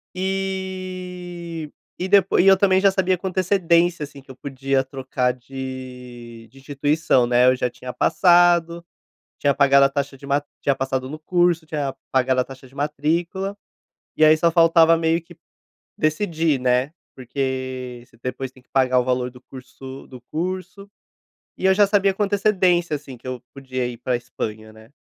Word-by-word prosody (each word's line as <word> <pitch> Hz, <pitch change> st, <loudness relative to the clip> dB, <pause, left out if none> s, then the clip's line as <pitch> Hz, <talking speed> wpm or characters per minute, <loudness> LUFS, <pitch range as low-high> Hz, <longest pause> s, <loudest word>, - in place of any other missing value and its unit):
E 185 Hz, -3 st, -5 dB, 0.3 s
e 185 Hz, -, -3 dB
depois 195 Hz, -2 st, +4 dB
e 195 Hz, -, +2 dB
eu 195 Hz, -, +8 dB
também 190 Hz, -1 st, +3 dB
já 195 Hz, 0 st, +5 dB
sabia 190 Hz, -1 st, +1 dB
com 190 Hz, -, -3 dB
antecedência, 175 Hz, -3 st, +2 dB
assim, 145 Hz, -1 st, -11 dB
que 135 Hz, -, -20 dB
eu 130 Hz, -, -10 dB
podia 135 Hz, 0 st, -1 dB
trocar 130 Hz, -1 st, -2 dB
de 125 Hz, -2 st, -9 dB
de 135 Hz, -, -18 dB
instituição, 145 Hz, -1 st, +1 dB
né, 125 Hz, +1 st, +4 dB
eu 130 Hz, -, +5 dB
já 125 Hz, -, -1 dB
tinha 125 Hz, +1 st, -8 dB
passado, 175 Hz, 0 st, +3 dB, 0.5 s
tinha 140 Hz, -1 st, +2 dB
pagado 140 Hz, 0 st, +5 dB
a -, -, +2 dB
taxa 140 Hz, 0 st, -3 dB
de 140 Hz, -, -12 dB
ma 140 Hz, +1 st, +1 dB, 0.2 s
tinha 140 Hz, -, +2 dB
passado 130 Hz, -1 st, -3 dB
no 155 Hz, -, -7 dB
curso, 175 Hz, 0 st, +1 dB
tinha 145 Hz, -3 st, -3 dB, 0.2 s
pagado 130 Hz, 0 st, +2 dB
a -, -, 0 dB
taxa 130 Hz, 0 st, -13 dB
de 130 Hz, -, -23 dB
matrícula, 165 Hz, +7 st, -2 dB, 0.6 s
e -, -, +2 dB
aí, 155 Hz, 0 st, +7 dB
só 170 Hz, +1 st, +3 dB
faltava 165 Hz, -1 st, +5 dB
meio 165 Hz, +1 st, +1 dB
que 165 Hz, -, -16 dB, 0.6 s
decidir, 155 Hz, -2 st, 0 dB
né, 125 Hz, +3 st, +1 dB, 0.2 s
porque 130 Hz, -1 st, -4 dB
você -, -, -25 dB
depois 130 Hz, +1 st, -4 dB
tem 130 Hz, -, -20 dB
que -, -, -44 dB
pagar 130 Hz, -1 st, +3 dB
o 125 Hz, -, +1 dB
valor 125 Hz, 0 st, -1 dB
do 125 Hz, 0 st, -16 dB
curso 130 Hz, +1 st, -11 dB
do 130 Hz, -2 st, -11 dB
curso, 185 Hz, +4 st, -5 dB, 0.7 s
e 190 Hz, -, -4 dB
eu 190 Hz, -, +6 dB
já 205 Hz, +1 st, +5 dB
sabia 200 Hz, -1 st, +2 dB
com 205 Hz, -, -1 dB
antecedência, 190 Hz, -5 st, +2 dB
assim, 140 Hz, -3 st, -9 dB
que 130 Hz, -, -13 dB
eu 125 Hz, -2 st, -5 dB
podia 130 Hz, -2 st, -4 dB
ir 120 Hz, -1 st, -5 dB
pra 125 Hz, +1 st, -1 dB
Espanha, 110 Hz, -2 st, -6 dB
né. 110 Hz, +1 st, -17 dB
145 Hz, 175 wpm, -22 LUFS, 130-175 Hz, 0.7 s, eu